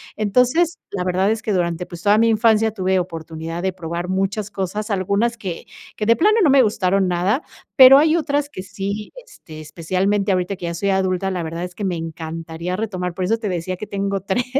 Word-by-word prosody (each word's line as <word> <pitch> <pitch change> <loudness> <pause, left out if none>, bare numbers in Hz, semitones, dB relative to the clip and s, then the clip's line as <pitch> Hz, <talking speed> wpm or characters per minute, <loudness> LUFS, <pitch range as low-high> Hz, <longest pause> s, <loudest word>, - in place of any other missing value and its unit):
Entonces, 250 - +2
la 190 -3 -2
verdad 185 +2 +1
es 220 0 -1
que 215 - -3
durante, 175 -2 -1
pues, 170 -1 -10
toda 205 +3 +4
mi 230 +1 +4
infancia 220 0 +3
tuve 190 -2 0
oportunidad 165 -1 -5
de 190 - 0
probar 170 0 -5
muchas 195 +2 -1
cosas, 205 +3 -4
algunas 200 +4 0
que 185 -6 -6 0.3
que 210 - -2
de 230 +2 +5
plano 425 - +3
no 320 - +4
me 275 0 +6
gustaron 195 -3 +1
nada, 180 - +1 0.3
pero 265 0 +10
hay 310 +2 +4
otras 290 -3 0
que 185 - -8
sí, 200 +1 -5
este, 155 - -13
especialmente 185 +6 -1
ahorita 185 +1 0
que 175 - -7
ya 170 - -3
soy 200 +4 -1
adulta. 190 0 0
La 180 -2 -3
verdad 165 +2 -4
es 180 -1 -10
que 210 - -6
me 185 -3 -1
encantaría 165 +2 -5
retomar. 185 -5 -3
Por 185 0 -2
eso 225 +5 +1
te 215 -3 -4
decía 180 +1 -3
que 210 - -7
tengo 195 -1 -2
3, 195 +6 -1
190 Hz, 210 wpm, -20 LUFS, 180-215 Hz, 0.3 s, pero